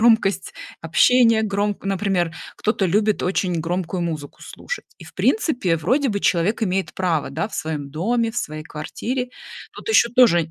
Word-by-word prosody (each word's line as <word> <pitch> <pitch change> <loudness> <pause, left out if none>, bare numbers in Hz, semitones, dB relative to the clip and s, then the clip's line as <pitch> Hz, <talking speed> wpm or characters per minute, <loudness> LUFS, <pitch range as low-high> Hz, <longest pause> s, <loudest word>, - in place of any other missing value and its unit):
громкость 220 -4 +3 0.3
общения, 230 +7 +4
громк 205 -1 -1
например, 190 -4 0 0.2
кто-то 210 -2 0
любит 210 +3 +1
очень 180 -2 0
громкую 175 +2 -2
музыку 155 -4 -4
слушать. - - -7
И - - -13
в - - -14
принципе, 245 - +1
вроде 255 - +1
бы, 200 -3 -1
человек 190 +6 +1
имеет 190 -2 -1
право, 175 -5 0
да, 150 +7 -2
в 220 - -10
своем 150 -3 -4
доме, 225 - 0
в 235 - -3
своей 155 -6 -4
квартире. 245 - -4 0.5
Тут - - -11
еще 335 - +5
тоже 190 - +4
195 Hz, 160 wpm, -22 LUFS, 165-225 Hz, 0.5 s, еще